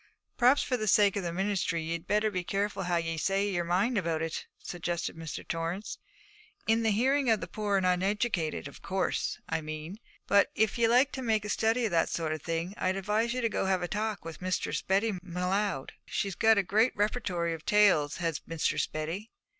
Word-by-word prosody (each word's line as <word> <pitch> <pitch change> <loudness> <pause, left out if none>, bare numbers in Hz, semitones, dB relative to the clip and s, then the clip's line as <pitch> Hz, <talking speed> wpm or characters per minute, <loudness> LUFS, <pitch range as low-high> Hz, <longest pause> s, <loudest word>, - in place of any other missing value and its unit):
'Perhaps 250 +4 +4
for 250 - 0
the 215 -2 -3
sake 205 -1 +5
of 200 - -1
the 175 -2 -3
ministry 180 -2 -1
ye'd 165 +1 -4
better 210 +1 +2
be 180 -2 -2
careful 200 +2 -1
how 175 -1 0
ye 165 -1 -2
say 195 +5 +1
your 180 -4 0
mind 195 +7 +1
about 165 -3 -1
it,' 165 -1 -4
suggested 175 0 -4
Mr. 165 -1 -7
Torrance; 165 +5 -3 0.7
'in 225 +1 +3
the 225 - +2
hearing 260 +5 +2
of 220 -2 +4
the - - -4
poor 205 +2 -1
and 190 - +1
uneducated, 185 -3 0
of 140 - -12
course, 190 -1 -1
I - - -1
mean. 155 +5 -6 0.3
But 200 0 +4
if 220 +1 +1
ye 230 - +5
like 250 +5 +4
to 260 - -5
make 220 -4 +1
a - - -4
study 225 +4 +1
o' - - +1
that 170 -3 +2
sort 160 -2 -1
of 155 - -5
thing, 165 +4 -3
I'd 185 +1 0
advise 210 +5 0
ye 255 - -1
to 230 - +1
go - - -1
and 190 - 0
have 185 -2 +1
a - - -1
talk 210 -2 -3
with 165 +1 -8
Mistress 185 0 -1
Betty 200 +4 +1
M'Leod. 180 -2 -1 0.2
She's 200 -1 -2
got 220 +3 +4
a 200 - +3
great 215 +6 +2
repertory 200 -6 0
of 160 -1 -7
tales, 200 -9 +4
has 165 -3 -2
Mistress 165 -1 0
Betty.' 165 +8 -4
195 Hz, 210 wpm, -30 LUFS, 170-215 Hz, 0.7 s, sake